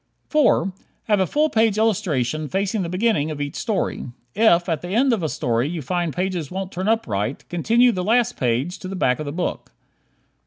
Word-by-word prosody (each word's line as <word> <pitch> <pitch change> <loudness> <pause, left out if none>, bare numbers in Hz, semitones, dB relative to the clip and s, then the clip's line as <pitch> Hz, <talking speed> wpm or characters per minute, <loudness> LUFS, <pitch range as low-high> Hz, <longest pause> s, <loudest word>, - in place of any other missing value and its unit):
4. 245 - +3 0.3
Have 210 -2 +2
a 190 - +2
full 300 - +2
page 220 -6 +2
illustration 155 - 0
facing 200 +2 -1
the 170 - -3
beginning 185 -5 +1
of 150 -2 -5
each 145 -1 -4
story. 215 -10 -2 0.3
If 190 -5 +4
at 165 -4 -1
the 175 - -6
end 240 +7 +2
of 220 - 0
a 160 - -1
story 120 +2 0
you 165 -3 -4
find 175 +4 -1
pages 180 -3 -2
won't 190 0 -5
turn 185 +3 -3
up 225 +1 +2
right, 105 +4 -3
continue 230 +8 +3
the 185 -4 -3
last 235 +4 +2
page 130 +8 -1
to 185 - -7
the 195 - -5
back 125 -7 +1
of 155 - -4
the - - -3
book. 175 +4 -3
180 Hz, 205 wpm, -22 LUFS, 155-220 Hz, 0.3 s, If